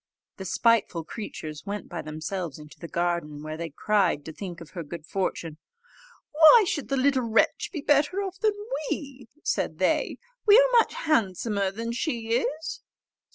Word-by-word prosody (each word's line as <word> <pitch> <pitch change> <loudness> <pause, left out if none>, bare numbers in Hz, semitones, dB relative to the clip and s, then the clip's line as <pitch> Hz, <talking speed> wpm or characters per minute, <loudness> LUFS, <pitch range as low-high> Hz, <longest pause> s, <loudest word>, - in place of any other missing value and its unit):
The 190 - -7
spiteful 205 -5 +2
creatures 155 -4 -7
went 205 0 -4
by 175 - -5
themselves 155 +1 -5
into 150 -1 -13
the 170 - -7
garden, 170 -4 -2
where 155 0 -5
they 165 +1 -5
cried 180 -2 +1
to 160 - -7
think 175 0 -7
of 165 -2 -12
her 175 - -5
good 160 0 -8
fortune. 165 -4 -3 0.7
"Why 320 +8 +8
should 290 - -2
the 275 - +1
little 265 0 +3
wretch 225 - +2
be 315 - -4
better 295 +7 +2
off 380 -1 -6
than 430 -1 +2 0.4
we?" 270 -5 -5 0.2
said - - -1
they. - - +1 0.3
"We 415 +1 +9
are - - +6
much - - +1
handsomer 205 - +1
than 230 +4 -4
she 235 -3 -2
is." 300 +6 -2
205 Hz, 165 wpm, -26 LUFS, 170-280 Hz, 0.7 s, We